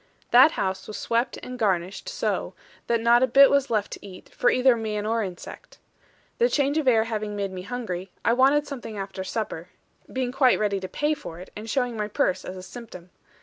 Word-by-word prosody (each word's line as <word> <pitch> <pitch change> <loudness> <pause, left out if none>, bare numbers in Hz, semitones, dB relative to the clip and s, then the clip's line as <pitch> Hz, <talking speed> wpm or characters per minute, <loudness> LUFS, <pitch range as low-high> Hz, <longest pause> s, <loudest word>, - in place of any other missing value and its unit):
That 255 +6 +7
house 190 0 -2
was 215 - -6
swept 235 +2 -1
and 250 0 -7
garnished 190 - -1
so, - - -2 0.3
that 235 -1 +1
not 235 +1 +5
a 260 - +4
bit 275 +3 +7
was 280 -1 +2
left 215 -3 0
to - - -8
eat, 190 -2 -12
for 245 - +1
either 255 -1 +4
man 215 -2 -3
or 225 +1 0
insect. 185 -4 -8 0.6
The 480 +1 +4
change 285 - +1
of 295 - -3
air 225 -3 +5
having 215 -2 -4
made 200 -1 -2
me 185 -1 -6
hungry, 195 -4 -5 0.2
I 230 - +4
wanted 275 +4 +4
something 240 -7 -7
after 195 -1 -5
supper; 185 -4 -4 0.4
being 255 -1 -2
quite 260 -1 +4
ready 205 -2 0
to 190 - -5
pay 295 +10 0
for 170 - -8
it, 185 - -11
and 215 +2 -7
showing 245 -2 -1
my 210 -1 -1
purse 190 -3 0
as 185 - -7
a 185 - -8
symptom. 185 -6 -11
225 Hz, 210 wpm, -25 LUFS, 195-255 Hz, 0.6 s, That